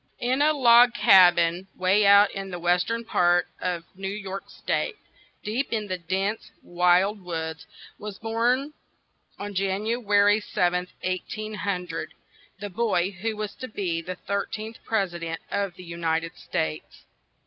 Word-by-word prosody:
In 255 +3 0
a 300 +1 +5
log 245 -4 +6
ca 190 -4 +8
bin 175 +2 0
way 195 +3 +3
out 200 0 +7
in 195 -1 -6
the 180 - -5
western 180 +7 0
part 175 -4 +3
of 175 -2 -2
New 190 +1 -6
York 195 -1 -6
State, 470 - -2 0.5
deep 235 +6 -2
in 220 -2 -1
the 185 -1 -2
dense, 195 +5 -2
wild 180 +4 +2
woods, 160 -3 -5 0.3
was 205 -2 -7
born, 240 +6 0 0.6
on 205 0 -6
Jan 195 +1 -1
u 235 +2 0
a - - -12
ry 205 0 +4
7th, 180 -3 0 0.2
1800, 185 -2 -4 0.4
the 205 -1 -6
boy 195 -4 0
who 215 +3 -4
was 210 -1 -4
to 255 - -7
be 180 -7 -2
the 185 +2 -6
thir 200 +2 -3
teenth 220 +1 -7
pres 195 -5 0
i 175 - -6
dent 165 -1 -5
of 200 -3 -2
the 185 - -11
U 170 -1 -8
nit 165 -1 0
ed 165 +1 -8
States. 75 -1 -4
195 Hz, 165 wpm, -25 LUFS, 175-215 Hz, 0.6 s, ca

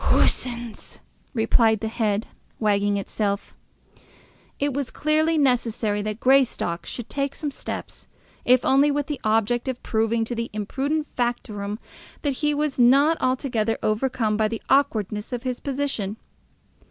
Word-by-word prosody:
"Coosins!" 235 -3 0 0.4
replied 225 -1 +3
the 220 - -3
head, 220 -2 0 0.3
wagging 205 -1 +2
itself. 200 0 -2 1.0
It 285 0 0
was 275 -1 -2
clearly 310 +1 +1
necessary 235 -6 +1
that 215 +1 -4
Greystock 250 -11 +2
should 240 - -6
take 275 0 -2
some 295 -2 -3
steps, - - -7 0.4
if 250 0 +4
only 275 +2 +5
with 290 0 0
the 290 -1 -5
object 225 +3 +1
of 260 -2 -4
proving 225 +1 +1
to 240 - -4
the 230 0 -3
impudent 275 +9 -1
factotum 215 -4 -2 0.5
that 280 -3 0
he 295 -1 +3
was 295 -2 -1
not 275 +6 +6
altogether 250 -4 0
overcome 220 -1 0
by 215 0 +2
the 225 0 -5
awkwardness 220 -7 +1
of 245 0 -3
his 255 -2 -2
position. 270 -7 -2
240 Hz, 140 wpm, -24 LUFS, 215-275 Hz, 1.0 s, not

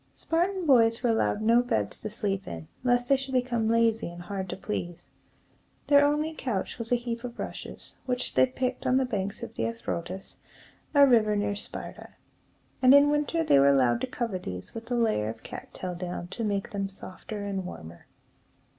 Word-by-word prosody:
Spartan 355 +3 0
boys 230 -4 +4
were 240 - +3
allowed 220 -1 +1
no 230 +2 +5
beds 245 -2 -1
to 215 - -3
sleep 205 -3 -2
in, 80 -2 -7 0.2
lest 245 -1 +2
they 275 - +5
should 265 0 -5
become 240 -3 +1
lazy 230 -3 +2
and 175 0 -9
hard 190 0 -4
to - - -4
please. 175 -4 -5 0.7
Their 285 -1 +6
only 300 +2 +1
couch 245 -10 -3
was 230 0 -5
a - - +6
heap 235 -1 -4
of 245 -1 -6
rushes, - - -7
which 250 0 -1
they - - +5
picked 255 0 -3
on 255 - +4
the 265 - +2
banks 200 -4 -3
of - - -7
the - - -4
Eu 115 0 0
ro´tas, 180 +3 -5 0.6
a 285 0 +8
river 220 -5 +4
near 205 0 0
Sparta; - - -8 0.7
and 260 +1 +8
in 285 +1 +6
winter 295 +3 +1
they 140 - +5
were 140 +1 +6
allowed 130 -4 +3
to - - -1
cover 230 -6 -3
these 90 - -7
with 230 +1 -8
a 245 - 0
layer 220 - +1
of 110 0 -8
cat - - -9
tail 185 -1 -5
down 175 0 -5
to 230 - -4
make 200 -2 -1
them 195 -1 -2
softer 200 +2 -8
and 195 -2 -2
warmer. 85 - -10
225 Hz, 200 wpm, -28 LUFS, 190-255 Hz, 0.7 s, a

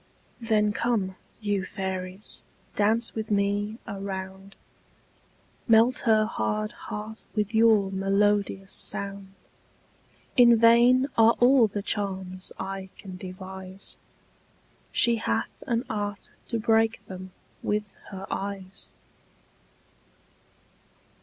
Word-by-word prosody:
Then 215 -3 +2
come, 205 -5 0 0.3
you 205 -2 0
fairies, 190 0 -5 0.3
dance 220 +3 +2
with 220 -1 -4
me 205 +1 0
a 195 -1 -6
round; 190 0 -6 1.1
Melt 230 +2 +5
her 215 -1 +5
hard 215 -1 -2
heart 215 -1 -7
with 210 0 -1
your 220 -3 +4
melodious 195 0 +1
sound. 195 -1 -3 1.0
In 235 -2 +7
vain 235 +3 +6
are 225 +1 +7
all 245 -1 +6
the 205 -1 -4
charms 190 -3 -2
I 190 0 -5
can 190 -2 -9
devise; 190 +1 -7 1.0
She 235 -1 +4
hath 225 0 -2
an 235 -1 +1
art 205 -2 -4 0.2
to 230 - -1
break 225 -1 +2
them 185 -1 -9 0.3
with 210 -1 -2 0.2
her 195 0 -7
eyes. 195 -1 -5
205 Hz, 100 wpm, -27 LUFS, 195-225 Hz, 1.1 s, In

